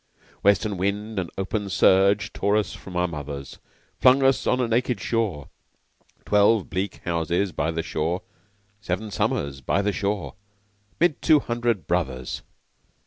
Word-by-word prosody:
Western 100 0 +2
wind 100 +3 -2
and 90 -3 -3
open 100 +1 -2
surge 95 +2 +3
Tore 100 +2 +1
us 105 -3 -1
from 95 - -10
our 90 0 +2
mothers; 70 -4 -7 0.4
Flung 130 +2 +5
us 135 0 +3
on 125 - +2
a 125 - +1
naked 120 +1 0
shore 105 - -2 0.8
(Twelve 105 0 +3
bleak 95 +1 -3
houses 85 +3 0
by 75 +1 -1
the 80 0 -2
shore! 85 +2 -2 0.6
Seven 100 +2 -3
summers 70 -7 -1
by 100 +9 0
the 105 0 0
shore!) 100 -1 -2 0.7
'Mid 170 -3 +2
two 155 -2 +5
hundred 120 - -1
brothers. 65 -8 -2
100 Hz, 140 wpm, -24 LUFS, 85-110 Hz, 0.8 s, Flung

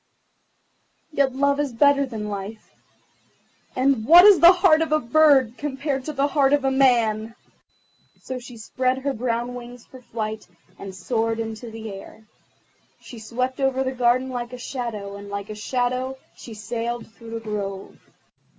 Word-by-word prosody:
Yet 275 -3 +1
Love 280 +1 +1
is 285 -4 -2
better 280 +3 +3
than 220 -4 -6
Life, 205 +1 -7 1.0
and 260 -3 +1
what 345 - +8
is 410 -3 +8
the 340 +1 +9
heart 355 -4 +4
of 320 - -1
a 310 - +3
bird 265 -2 +3
compared 275 -1 -3
to 305 - -4
the 275 0 +1
heart 280 -1 +2
of 285 -2 +2
a 270 - +2
man?" 230 -4 +2 0.8
So 260 -1 -6
she 245 -1 -12
spread 255 +3 -1
her 275 +1 -2
brown 240 +1 -2
wings 245 -1 -10
for 260 - -14
flight, 220 -2 -5 0.3
and 195 -1 -8
soared 225 +2 -2
into 225 +1 -6
the 220 -1 -8
air. 195 +3 -12 0.7
She 240 - -12
swept 250 +4 -3
over 265 -1 +1
the 260 - -2
garden 255 0 +1
like 245 0 -5
a - - -6
shadow, 230 -6 -6
and 200 0 -10
like 200 +1 -6
a - - -4
shadow 255 +4 -2 0.2
she 230 - -11
sailed 230 +2 -4
through 230 -1 -13
the - - -3
grove. 200 -3 -6
245 Hz, 165 wpm, -23 LUFS, 225-270 Hz, 1.0 s, the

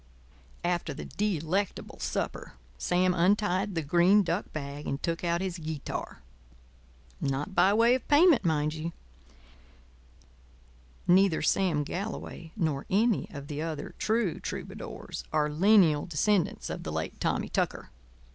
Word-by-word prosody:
After 175 0 -1
the - - -7
delectable 195 -1 -2
supper, - - -3 0.3
Sam 180 +1 +2
untied 190 +2 +2
the 165 - -1
green 175 +7 +4
duck 180 +3 -2
bag 145 -1 -6
and 140 - -2
took 170 0 -2
out 170 0 +1
his 185 -2 -3
guitar. 155 -3 -5 1.0
Not 140 +7 -2
by 190 - +5
way 230 +2 +5
of 255 - -2
payment, 300 - +6
mind 155 -3 +1
you—neither 60 - -4
Sam 165 -3 +2
Galloway 175 -1 -6
nor 155 -9 -1
any 220 +3 +2
other - - -9
of 140 - -7 0.3
the 145 - -7
true 220 -5 0
troubadours - - -6
are 150 -1 +2
lineal 170 -3 +4
descendants 175 +3 0
of - - -5
the 80 - -5
late 80 +1 -4
Tommy - - -1
Tucker. - - -2
170 Hz, 130 wpm, -29 LUFS, 145-195 Hz, 1.0 s, payment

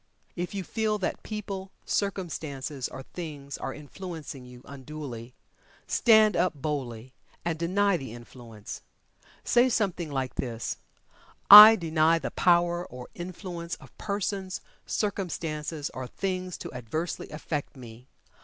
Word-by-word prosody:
If 175 +2 -4
you 195 - -2
feel 215 +3 -1
that 200 - -3
people, 195 -3 -5 0.2
circumstances, 155 -9 -2
or 135 - -8
things 145 -4 -7
are - - -3
influencing 150 -2 -8
you 125 0 -13
unduly, 135 -4 -8 0.5
stand 220 -3 +5
up 175 -1 +2
boldly, 130 -5 -4 0.3
and 165 -2 -1
deny 195 +3 +2
the 135 -7 -7
influence. 120 -2 -10 0.6
Say 245 +2 +4
something 190 -8 0
like 135 -2 -2
this, 115 -3 -3 0.7
"I 210 +2 +14
DENY 165 -3 +3
the 140 - -4
power 175 0 +3
or 125 -6 -10
influence 175 -1 -6
of - - -17
persons, 200 -2 -2 0.3
circumstances, 160 -7 -2
or 130 -1 -5
things 185 +3 -3
to - - -8
adversely 130 +8 -4
affect 150 -2 -4
me. 120 0 -12
165 Hz, 125 wpm, -28 LUFS, 135-190 Hz, 0.7 s, I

